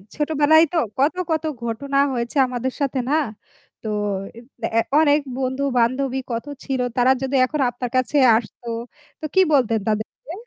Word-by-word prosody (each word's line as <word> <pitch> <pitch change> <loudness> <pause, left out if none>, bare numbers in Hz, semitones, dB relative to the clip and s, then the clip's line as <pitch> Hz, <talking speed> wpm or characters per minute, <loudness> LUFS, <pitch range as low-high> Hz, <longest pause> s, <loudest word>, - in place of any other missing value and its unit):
ছোটবেলায় 305 +1 +4
তো - - +1 0.2
কত, 285 +4 +3 0.2
কত, 315 -1 0 0.2
ঘটনা 275 +5 -2 0.2
হয়েছে 240 +2 -3
আমাদের 250 +1 -3
সাথে, 275 -1 0
না? 295 - +2 0.7
তো - - -7 0.9
এ্যা - - +5 0.2
অনেক 295 -1 +4 0.2
বন্ধু-বান্ধবী 260 0 0
কত 230 +2 -3 0.2
ছিল। 265 -1 -2 0.2
তারা 250 +1 +4
যদি 270 +1 -2
এখন 300 +3 -3
আপনার 245 0 -5
কাছে 255 +3 +1 0.2
আসতো, 235 +1 -8 0.5
তো - - -6
কি 380 - +6
বলতেন 235 -5 +3
তাদেরকে? 215 +8 -4
260 Hz, 145 wpm, -21 LUFS, 245-285 Hz, 0.9 s, কি